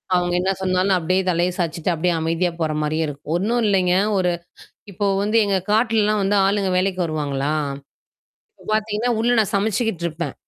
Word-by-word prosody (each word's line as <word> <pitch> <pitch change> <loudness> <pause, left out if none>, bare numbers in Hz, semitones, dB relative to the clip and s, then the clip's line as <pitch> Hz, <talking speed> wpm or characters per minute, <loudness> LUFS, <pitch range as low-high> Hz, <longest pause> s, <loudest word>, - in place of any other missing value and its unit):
அவங்க 175 0 0
என்ன 190 +1 +1
சொன்னாலும், 185 +1 +2
அப்படியே 185 +3 +1
தலைய 175 +1 +1
சாயச்சுட்டு, 170 0 -1
அப்படியியே 175 +2 0
அமைதியா 165 +2 0
போற 155 -1 0
மாரியே 155 +1 0
இருக்கும். 145 +2 -6
ஒண்ணும் 230 +6 0
இல்லைங்க, 185 -2 +2 0.2
ஒரு 180 -1 +1 0.6
இப்போ 205 +2 -2 0.2
வந்து 215 +2 0
எங்க 195 -1 +1
காட்டுல 225 0 +3
எல்லாம் 210 0 +1
வந்து 200 +1 +1
ஆளுங்க 200 -1 +1
வேலைக்கு 185 0 0
வருவாங்களா, 145 -2 -2 1.1
இப்ப - - -17
பாத்தீங்கன்னா, 215 +2 -1
உள்ள 240 +2 +1
நான் 210 - -1
சமைச்சுக்கிட்டு 205 -3 -1
இருப்பேன். 165 +2 -5
185 Hz, 165 wpm, -21 LUFS, 165-205 Hz, 1.1 s, காட்டுல